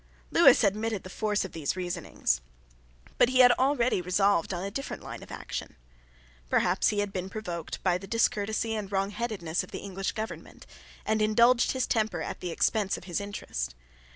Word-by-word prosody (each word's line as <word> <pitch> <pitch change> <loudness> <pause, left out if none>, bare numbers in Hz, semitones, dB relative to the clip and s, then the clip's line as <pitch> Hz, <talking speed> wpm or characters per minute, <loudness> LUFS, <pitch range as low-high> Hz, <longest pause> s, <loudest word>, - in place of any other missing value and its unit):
Lewis - - +7
admitted 215 +1 0
the 185 - -9
force 210 -1 0
of 190 - -8
these 160 -1 -2
reasonings: 175 - -1 0.8
but 240 - +6
he 255 0 +5
had 245 -1 +8
already 255 -5 +2
resolved 185 0 +2
on 180 -1 -3
a 200 - -4
different 275 +6 -5
line - - -7
of - - -12
action. - - -6 0.7
Perhaps - - +2
he 205 -1 +1
had 205 -1 -3
been 185 0 -3
provoked 175 -6 -5
by 180 -1 +2
the 195 - -10
discourtesy 220 0 0
and 210 -3 -4
wrongheadedness 195 -4 -1
of 185 - -11
the - - -6
English 195 -1 -3
government, 220 0 -7 0.4
and 220 0 +1
indulged 235 +3 +4
his 260 -1 0
temper 220 -4 0
at - - -5
the 180 - -4
expense 200 +3 +1
of - - -11
his 180 +2 -3
interest. 200 - -5
205 Hz, 180 wpm, -28 LUFS, 185-220 Hz, 0.8 s, had